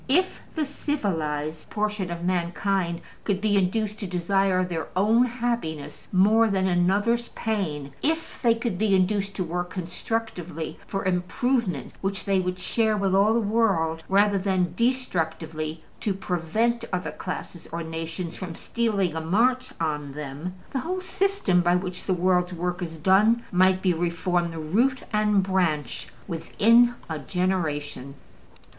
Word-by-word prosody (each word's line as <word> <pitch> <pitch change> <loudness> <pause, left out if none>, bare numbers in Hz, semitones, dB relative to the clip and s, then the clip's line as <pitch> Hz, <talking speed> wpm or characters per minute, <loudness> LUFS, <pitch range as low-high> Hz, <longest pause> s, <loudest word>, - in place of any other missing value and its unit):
If 365 +7 +2
the 315 -2 +1
civilized 160 - -2
portion 210 -3 -1
of 170 0 -5
mankind 175 0 0 0.2
could 200 -3 0
be 205 0 +2
induced 210 +2 +1
to 200 - -4
desire 185 +1 +2
their 165 -4 -3
own 220 +6 +4
happiness 235 - -3
more 215 +4 +5
than 190 -2 +1
another's 200 +7 +2
pain, 155 -11 -2
if 320 +2 -1
they 235 -2 +4
could 230 -5 -3
be 210 -2 +3
induced 195 +1 +1
to 185 - -1
work 175 +1 -3
constructively 175 -2 -4
for 195 -1 -3
improvements 185 - 0
which 195 0 -2
they 195 -1 +2
would 180 0 -1
share 220 +3 +1
with 195 -2 +1
all 205 +3 +4
the - - +4
world 195 -7 +1
rather 200 +1 +4
than 185 -3 0
destructively 160 -10 -1 0.2
to 200 -3 -1
prevent 200 +6 0
other 180 -1 -2
classes 180 -2 -6
or 170 +1 -3
nations 165 +1 -5
from 180 -3 -6
stealing 205 -7 0
a 160 - -1
march 245 +10 +2
on 150 -3 -2
them, 150 +5 -6 0.2
the 265 - -1
whole 360 +8 -2
system 370 - +1
by 175 0 +3
which 180 0 -3
the 190 - +2
world's 180 0 +2
work 180 +2 -2
is 165 -2 -5
done 205 +8 +4
might 185 +1 +4
be 185 -2 +4
reformed 170 -1 -1
root 260 +5 +3
and 210 -2 +3
branch 170 -9 0 0.2
within 230 +8 +4
a 160 -2 -3
generation. 150 -5 -2
185 Hz, 145 wpm, -25 LUFS, 170-215 Hz, 0.2 s, more